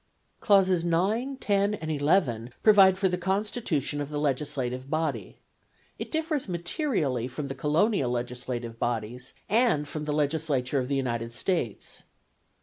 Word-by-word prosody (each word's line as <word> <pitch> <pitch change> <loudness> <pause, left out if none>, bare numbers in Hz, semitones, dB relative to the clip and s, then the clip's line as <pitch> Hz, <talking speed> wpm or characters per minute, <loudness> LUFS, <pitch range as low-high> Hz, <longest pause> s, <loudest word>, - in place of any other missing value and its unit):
Clauses 190 -4 +4
9, 210 +11 0
10, 200 -4 +1
and 160 -5 -5
11 145 - +1
provide 195 -3 +7
for 190 0 +2
the 180 -1 -1
constitution 190 - -1
of 145 - -4
the 150 - -4
legislative 135 -3 -2
body; 155 +1 -2 0.6
it - - -5
differs 315 - -1
materially 170 - -1
from 140 +2 -5
the - - -3
colonial 150 - +1
legislative 120 -1 -4
bodies, 120 +2 -3
and 215 -9 +2
from 150 +1 -5
the 150 - -2
Legislature 145 -3 0
of 125 - -2
the 140 - -1
United 120 -3 -2
States. 120 - -2
150 Hz, 140 wpm, -27 LUFS, 125-195 Hz, 0.6 s, provide